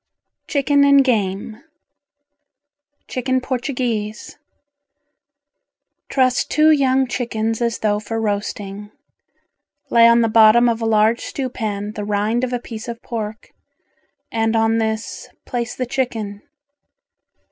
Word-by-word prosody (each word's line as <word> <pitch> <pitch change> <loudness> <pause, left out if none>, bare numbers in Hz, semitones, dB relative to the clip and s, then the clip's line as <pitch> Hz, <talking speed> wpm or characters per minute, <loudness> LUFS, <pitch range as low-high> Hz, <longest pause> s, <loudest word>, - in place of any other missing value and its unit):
CHICKEN 285 0 +2
AND 280 -1 +6
GAME 215 -2 -1 1.5
Chicken 260 0 -1
Portuguese 245 -4 -3 1.7
Truss 255 -2 +2
two 310 +1 +3
young 265 -3 +3
chickens 225 -2 -2
as 235 -1 0
though 210 -1 0
for 225 +1 -4
roasting. 205 -1 -4 1.0
Lay 230 -1 +7
on 235 0 +5
the 230 - +2
bottom 225 +2 +6
of 230 -1 0
a 225 - 0
large 220 +1 +3
stew 265 -2 -4
pan 210 -3 -4
the 210 -1 -6
rind 210 +4 0
of 255 - -1
a 245 - 0
piece 230 -2 -8
of 235 -1 -6
pork, 220 -2 -6 0.8
and 225 0 0
on 225 0 +2
this, 220 0 -3 0.2
place 240 -2 -3
the 255 - -2
chicken. 225 -5 -3
230 Hz, 120 wpm, -20 LUFS, 215-250 Hz, 1.7 s, Lay